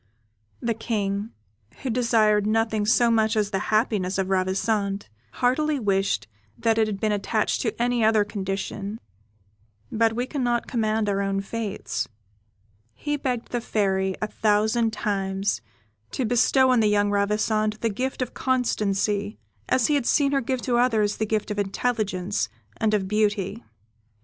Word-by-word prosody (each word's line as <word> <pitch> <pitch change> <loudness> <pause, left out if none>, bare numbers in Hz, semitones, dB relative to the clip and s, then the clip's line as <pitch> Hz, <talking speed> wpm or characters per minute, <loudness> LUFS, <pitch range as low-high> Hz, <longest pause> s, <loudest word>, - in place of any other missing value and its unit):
The 235 -1 0
King, 210 -2 -2 0.5
who 260 - -1
desired 220 -3 +3
nothing 220 -1 +1
so 235 +1 +4
much 220 0 +2
as 210 -1 +1
the 195 - 0
happiness 215 -4 +1
of 190 -1 -1
Ravissante, 195 +2 0 0.3
heartily 290 +4 +1
wished 195 -3 0 0.3
that 225 -1 +1
it 220 - +3
had 205 -2 -4
been 215 0 +1
attached 210 +1 0
to 225 -2 -2
any 240 -1 +1
other 215 -1 +4
condition, 200 +1 -4 0.9
but 225 0 +2
we 245 +2 -1
cannot 245 -4 -1
command 220 -2 0
our 200 -1 +1
own 195 0 0
fates. 210 +1 -3 0.9
He 295 0 -2
begged 250 -4 -3
the 240 - -1
Fairy, 190 -4 0
a - - 0
thousand 220 +2 +1
times, 195 - -1 0.5
to 260 - -1
bestow 255 +3 +4
on 250 - +4
the 215 - +4
young 205 0 +2
Ravissante 210 +1 +1
the 230 - +1
gift 255 +5 -2
of 250 - -8
constancy, 210 -5 0 0.3
as 255 -3 +3
he 300 - +2
had 280 -5 +1
seen 280 -2 +3
her 275 -1 +2
give 255 0 -2
to 245 -2 +1
others 220 -4 +2
the 220 - -1
gifts 215 -1 -1
of 205 - -2
intelligence 200 - -1 0.3
and 215 -1 +2
of 195 -2 -1
beauty. 210 0 0
215 Hz, 155 wpm, -25 LUFS, 200-235 Hz, 0.9 s, so